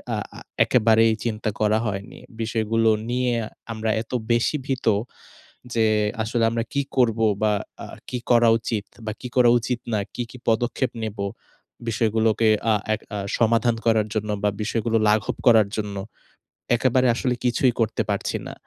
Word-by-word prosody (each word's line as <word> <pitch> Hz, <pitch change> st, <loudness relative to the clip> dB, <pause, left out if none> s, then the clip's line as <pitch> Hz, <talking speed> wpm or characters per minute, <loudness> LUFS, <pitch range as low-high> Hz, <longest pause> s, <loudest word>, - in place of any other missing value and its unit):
আ -, -, -2 dB, 0.2 s
আ -, -, -8 dB, 0.2 s
একেবারেই 115 Hz, -1 st, +4 dB
চিন্তা 110 Hz, -1 st, -2 dB
করা 110 Hz, 0 st, +2 dB
হয়নি। 100 Hz, -1 st, -5 dB, 0.2 s
বিষয়গুলো 115 Hz, 0 st, +1 dB, 0.2 s
নিয়ে 125 Hz, 0 st, 0 dB, 0.4 s
আমরা 110 Hz, 0 st, -3 dB
এত 115 Hz, -, -12 dB, 0.2 s
বেশি 120 Hz, +5 st, +2 dB
ভীত 130 Hz, -2 st, -2 dB, 0.9 s
যে, 115 Hz, -1 st, +3 dB, 0.4 s
আসলে 115 Hz, +1 st, 0 dB
আমরা 115 Hz, 0 st, -1 dB
কী 140 Hz, -, +1 dB
করবো 115 Hz, -3 st, +3 dB, 0.2 s
বা, 105 Hz, -1 st, +3 dB, 0.3 s
আ -, -, -8 dB, 0.2 s
কি 125 Hz, -, -3 dB
করা 120 Hz, -1 st, +5 dB
উচিত 110 Hz, -2 st, -3 dB, 0.2 s
বা, 110 Hz, -, -2 dB
কি 125 Hz, -, -6 dB
করা 125 Hz, -2 st, +6 dB
উচিত 120 Hz, +1 st, -3 dB
না, 110 Hz, -, +2 dB, 0.2 s
কি, 125 Hz, -, -2 dB
কি 125 Hz, -, -11 dB
পদক্ষেপ 120 Hz, +3 st, +1 dB
নেব 110 Hz, -1 st, -4 dB, 0.7 s
বিষয়গুলোকে 110 Hz, 0 st, +2 dB, 0.2 s
আ -, -, +4 dB, 0.2 s
এক 110 Hz, -, -5 dB, 0.2 s
আ -, -, -2 dB, 0.2 s
সমাধান 115 Hz, +1 st, +3 dB
করার 110 Hz, -2 st, +3 dB
জন্য 105 Hz, 0 st, -2 dB
বা, 105 Hz, -, +3 dB
বিষয়গুলো 115 Hz, +1 st, 0 dB
লাঘব 105 Hz, 0 st, +1 dB
করার 110 Hz, -4 st, +6 dB
জন্য? 105 Hz, -2 st, -3 dB, 0.8 s
একেবারে 130 Hz, +1 st, +2 dB
আসলে 125 Hz, 0 st, 0 dB
কিছুই 125 Hz, +1 st, +3 dB
করতে 110 Hz, -1 st, +1 dB
পারছি -, -, -1 dB
না। -, -, -7 dB
115 Hz, 160 wpm, -23 LUFS, 110-120 Hz, 0.9 s, করা